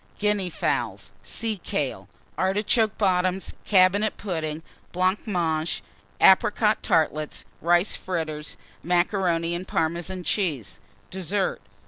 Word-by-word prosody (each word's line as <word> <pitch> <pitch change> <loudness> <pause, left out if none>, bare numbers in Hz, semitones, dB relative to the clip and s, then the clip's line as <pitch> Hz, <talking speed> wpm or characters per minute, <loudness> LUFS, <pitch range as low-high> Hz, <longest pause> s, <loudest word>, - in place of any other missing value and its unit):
Guinea 210 -3 +1
Fowl. 115 - -1 0.2
Sea 225 -2 -3
kale. - - -3 0.3
Artichoke 205 +3 +1
Bottoms. 185 -1 +1
Cabinet 200 +2 +4
Pudding. 160 -5 -3 0.3
Blancmange. 175 -4 0 0.4
Apricot 210 +3 +5
Tartlets. 155 -1 0 0.2
Rice 175 +4 +3
Fritters. 155 -4 -4 0.2
Macaroni 175 -1 +1
and 180 +2 -4
Parmesan 170 +3 -1
Cheese. 155 - -1 0.3
DESSERT. 190 +1 -1
180 Hz, 90 wpm, -25 LUFS, 165-195 Hz, 0.4 s, Apricot